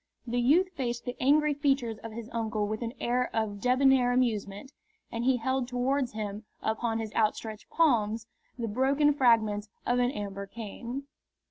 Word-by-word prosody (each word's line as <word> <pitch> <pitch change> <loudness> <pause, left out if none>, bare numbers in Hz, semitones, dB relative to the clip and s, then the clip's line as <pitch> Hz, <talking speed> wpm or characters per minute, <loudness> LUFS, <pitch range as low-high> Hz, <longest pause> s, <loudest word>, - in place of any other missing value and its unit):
The 245 0 0
youth 330 +10 +4
faced 240 -8 -3
the 245 - -4
angry 295 +3 +4
features 270 -6 0
of 225 - -8
his 225 0 -7
uncle 220 -2 -1
with 215 +2 -3
an 235 +2 -4
air 250 +1 0
of 210 -3 -1
debonair 255 0 +4
amusement, 230 -1 -1 0.4
and 230 +1 -3
he 260 -1 +4
held 260 +1 -1
towards 255 +1 0
him, 210 0 -4 0.2
upon 225 +1 -1
his 220 -1 -4
outstretched 215 0 -1
palms, 225 -8 +2 0.3
the 235 -2 -2
broken 275 +6 +3
fragments 220 -6 +3 0.2
of 245 +1 +2
an 245 0 +3
amber 200 -4 -5
cane. 235 +5 -6
240 Hz, 160 wpm, -29 LUFS, 220-260 Hz, 0.4 s, youth